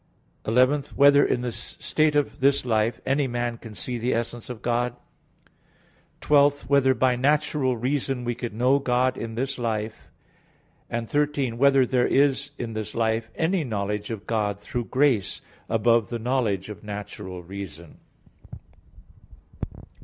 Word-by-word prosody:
(11) 130 +6 +4
Whether 140 0 +6
in 120 - +1
the 125 -1 -2
state 150 +6 -1
of 145 -1 0
this 135 0 +3
life 110 -1 +1
any 140 +1 +1
man 120 -1 -2
can 110 -2 -10
see 125 +2 -3
the 120 +1 0
essence 120 +1 -4
of 120 -3 -7
God? 120 +1 0 1.3
(12) 145 -1 +4
Whether 135 -2 +3
by 125 +1 +2
natural 140 -1 +1
reason 130 +1 -1
we 120 0 -1
can 120 -2 -6
know 130 +4 +4
God 130 -1 +1
in 115 -2 -6
this 130 +2 -2
life? 110 -2 -3 0.8
(13) 130 +1 -1
Whether 135 -1 +5
there 125 0 +2
is 140 0 +2
in 115 -2 -4
this 110 -1 -5
life 110 0 0
any 170 +1 +1
knowledge 105 -3 -3
of 110 -3 -5
God 105 -3 -1
through 120 +3 -4
grace 125 -8 +1 0.3
above 115 -1 +3
the 120 - -2
knowledge 115 -5 0
of 105 -5 -9
natural 100 -3 -7
reason? 85 -3 -9
120 Hz, 140 wpm, -25 LUFS, 110-135 Hz, 1.3 s, Whether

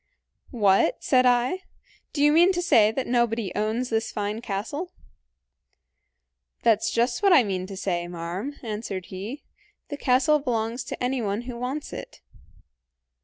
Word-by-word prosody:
"'What,' 200 -6 +2
said 255 -1 +4
I; 250 +9 +2 0.5
'do 285 - 0
you 295 - +6
mean 345 +4 +6
to 355 - -1
say 215 -10 +5
that 260 +3 -3
nobody 235 -4 0
owns 220 +4 -1
this 225 0 0
fine 210 +2 -3
castle?' 240 - -4 1.7
"'That's 220 -1 +3
just 240 +5 0
what 400 -1 +4
I 290 -8 +7
mean 185 -3 -3
to 195 -1 -8
say, 175 -3 -2
marm,' 175 +10 -5
answered 210 -4 -4
he; 210 +10 -6 0.5
'the 290 - -5
castle 275 +4 +3
belongs 235 -2 -2
to - - -5
anyone 235 -5 -1
who 245 0 -7
wants 255 +5 -4
it.' - - -8
235 Hz, 145 wpm, -25 LUFS, 205-260 Hz, 1.7 s, I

